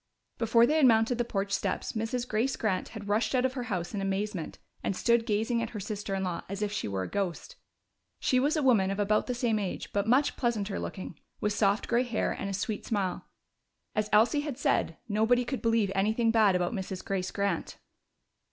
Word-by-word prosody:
Before 230 +1 +5
they 305 +6 +2
had 290 -4 +6
mounted 230 +1 +3
the - - +3
porch 200 -4 -2
steps, 195 -1 -1
Mrs. 235 +2 -2
Grace 240 +5 0
Grant 200 -4 -1
had 215 -3 -8
rushed 215 +3 +1
out 255 0 +3
of 260 - 0
her 250 -2 -4
house 175 -2 -2
in 200 - -2
amazement 195 -2 -2 0.2
and 195 - -1
stood 235 +2 +2
gazing 225 +2 +1
at 230 - -2
her 215 - -6
sister 205 -1 -4
in 190 - -2
law 180 -2 -2
as 200 +2 -3
if 205 - -1
she 210 - -2
were 95 -2 -2
a - - -4
ghost. 200 - -3 0.6
She 255 - +2
was 290 +5 +2
a 300 - +1
woman 220 -8 +4
of 195 - -2
about 210 +1 +2
the 250 - -1
same 235 -3 +1
age, 195 -3 -4
but 205 +1 0
much 260 +5 +3
pleasanter 215 -5 -1
looking, 180 -4 -6 0.2
with 210 - 0
soft 205 0 +1
gray 240 0 +3
hair 240 -3 -1
and 200 - -4
a - - -3
sweet 210 +2 -3
smile. 195 -5 -2 0.7
As 215 0 -1
Elsie 235 +8 +4
had 290 -4 -5
said, 275 - +1
nobody 225 +4 +2
could 265 +1 -3
believe 225 -4 +2
anything 220 +4 +2
bad 215 -4 +4
about 180 +4 0
Mrs. 190 -2 -5
Grace 190 -1 -1
Grant. 200 -4 -2
215 Hz, 215 wpm, -29 LUFS, 195-240 Hz, 0.7 s, had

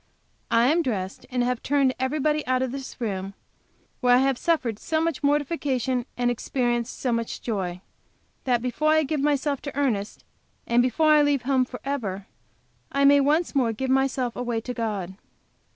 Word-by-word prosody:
I 230 0 +4
am 330 +3 +3
dressed, 200 - -4
and 250 -1 0
have 250 -1 -1
turned 275 -2 +2
everybody 300 +3 0
out 255 0 +2
of 260 - -2
this 270 0 -7
room, 195 -4 -3 0.6
where 245 -1 +5
I 250 - +4
have 270 0 +2
suffered 245 -8 0
so 315 - -1
much 325 -3 -1
mortification, 280 -4 0
and 245 0 +1
experienced 240 0 -1
so 255 - -1
much 230 -1 -2
joy, 185 -6 -3 0.6
that 245 -2 +1
before 295 +5 0
I 315 0 +4
give 305 +1 -2
myself 285 -1 0
to 285 -1 -7
Ernest, 220 -8 -1 0.4
and 235 +1 +3
before 280 +6 +2
I 300 -1 +6
leave 290 -3 +2
home 260 -1 +2
forever, 245 -7 -4 0.7
I 280 0 +2
may 285 0 +7
once 300 +5 +2
more 250 -5 +2
give 260 +4 -2
myself 265 -2 +1
away 240 -2 -2
to 250 +2 -5
God. 210 -6 -3
255 Hz, 170 wpm, -25 LUFS, 235-285 Hz, 0.7 s, may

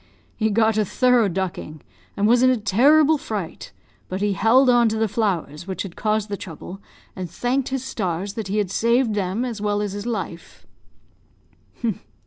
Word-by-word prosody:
He 220 -1 0
got 220 0 +2
a - - +3
thorough 245 +2 +3
ducking, 175 -5 -4 0.3
and 205 - +2
was 240 +2 +4
in 255 - +5
a 255 - +3
terrible 285 +9 +4
fright; 205 -10 -6 0.4
but 185 - -3
he 205 0 +1
held 230 +7 +4
on 240 -2 +5
to 220 - -2
the 220 0 +1
flowers 185 -6 -2
which 190 - -3
had 190 -4 -9
caused 215 -1 0
the 205 -1 -4
trouble, 185 +2 -9 0.3
and 185 -2 -5
thanked 245 +9 -1
his 265 -1 -3
stars 195 -4 -3
that 215 -2 -5
he 200 +2 -2
had 200 -3 0
saved 235 +2 +2
them 205 +4 -1
as 230 -4 -5
well 205 0 0
as 205 -2 -2
his 205 +3 -5
life. 190 -7 -6
210 Hz, 180 wpm, -22 LUFS, 190-235 Hz, 0.4 s, in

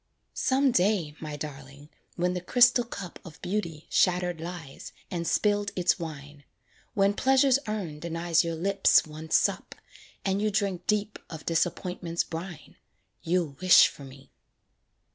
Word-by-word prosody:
Some 270 -1 +2
day, 180 -7 +1
my 155 -2 -6
darling, 145 0 -9 0.3
when 180 +1 0
the 180 - -3
crystal 245 +5 +4
cup 200 -6 -8
Of 160 -3 -12
Beauty 170 -5 -3
shattered 180 -2 +1
lies, 165 -5 -8 0.2
and 170 -2 -3
spilled 205 -1 +1
its 180 +1 +1
wine; 145 -3 -8 0.5
When 200 0 +3
Pleasure's 265 +3 +3
urn 190 -8 -4
denies 170 0 0
your 165 -1 -3
lips 195 +4 +3
one 155 +1 -10
sup, - - +1 0.5
And 195 +1 0
you 215 - +1
drink 200 -3 -2
deep 210 0 0
of 160 -2 -9
Disappointment's 175 0 -1
brine, 165 0 -8 0.4
You'll 165 -4 -1
wish 185 -1 +8
for 145 - -13
me. 135 0 -14
175 Hz, 140 wpm, -27 LUFS, 160-200 Hz, 0.5 s, wish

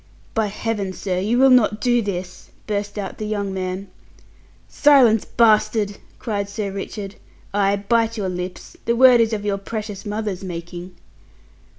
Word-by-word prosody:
"By 220 -2 +1
Heaven, 205 -2 -3
sir, 185 -1 -2
you 215 +6 +1
will 265 +1 +6
not 220 -4 +4
do 240 +1 +2
this!" 180 -3 -5 0.2
burst 205 0 -3
out 200 -2 -5
the 215 - -3
young 200 -2 -2
man. 185 +1 -4 0.8
"Silence, 255 -7 +5
bastard!" 215 -2 +2 0.2
cried 205 -4 -3
Sir 200 -1 -3
Richard. 200 +1 -6 0.4
"Ay, 200 0 +2
bite 230 0 +2
your 200 -3 -2
lips; 180 0 -6
the 235 - +2
word 250 -1 +7
is 225 0 +2
of 210 -2 -3
your 200 -1 0
precious 210 -1 -6
mother's 210 -3 -3
making!" 175 0 -7
205 Hz, 155 wpm, -21 LUFS, 195-225 Hz, 0.8 s, word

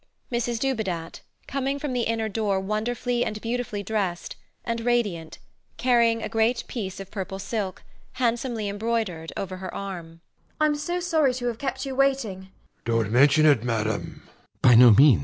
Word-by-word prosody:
MRS 240 -1 -1
DUBEDAT 210 -11 -2 0.2
[coming 275 0 -2
from 285 -2 -3
the 245 -2 0
inner 225 -1 0
door 205 -2 0
wonderfully 235 +4 -1
and 215 -1 -3
beautifully 230 -3 -3
dressed, 195 -4 -2 0.3
and 230 0 -2
radiant, 210 -9 -1 0.4
carrying 235 -2 +3
a - - -1
great 225 +2 +1
piece 195 -6 -5
of 195 -1 -9
purple 190 -1 -4
silk, 195 -1 -4 0.3
handsomely 235 -3 -1
embroidered, 205 -6 -2
over 185 -1 -4
her 185 0 -6
arm] 170 -4 -7 0.4
I'm 305 -1 +3
so 295 +5 -2
sorry 315 -7 +2
to 250 -1 -4
have 235 -2 -2
kept 265 0 -3
you 270 - -4
waiting. 250 -9 0
230 Hz, 130 wpm, -25 LUFS, 195-245 Hz, 0.4 s, carrying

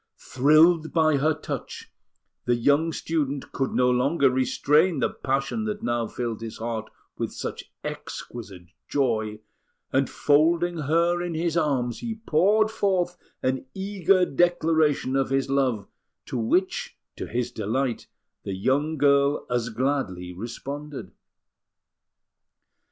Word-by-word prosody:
Thrilled 155 +5 +4
by 155 -3 +3
her 155 +3 +2
touch, 155 - -7 0.5
the 120 - +3
young 145 +7 +2
student 145 -4 -2
could 135 - -1
no 125 0 +3
longer 135 +2 +3
restrain 150 +6 +2
the - - 0
passion 135 +11 -2
that 210 -1 -4
now 120 -1 0
filled 115 -2 -4
his 115 -1 -6
heart 110 -1 -4 0.3
with - - -2
such - - -6
exquisite 100 -7 -7 0.2
joy; 110 -6 0 0.5
and 135 0 +2
folding 165 +4 +2
her 170 +4 +2
in 175 -2 -3
his 165 0 -1
arms, 135 -7 0
he 230 -2 -4
poured 215 +2 +2
forth 185 -5 0 0.3
an 130 0 -1
eager 190 -1 +2
declaration 160 -4 +2
of 135 0 +1
his 135 0 0
love, 130 -6 +1 0.4
to - - -6
which, 150 +11 0 0.2
to - - -6
his 120 +1 -2
delight, 120 +3 -2 0.3
the 95 - -4
young 145 +10 0
girl 140 0 +3
as 120 -1 0
gladly 110 -8 -2
responded. 130 - -7
140 Hz, 125 wpm, -25 LUFS, 120-165 Hz, 0.5 s, Thrilled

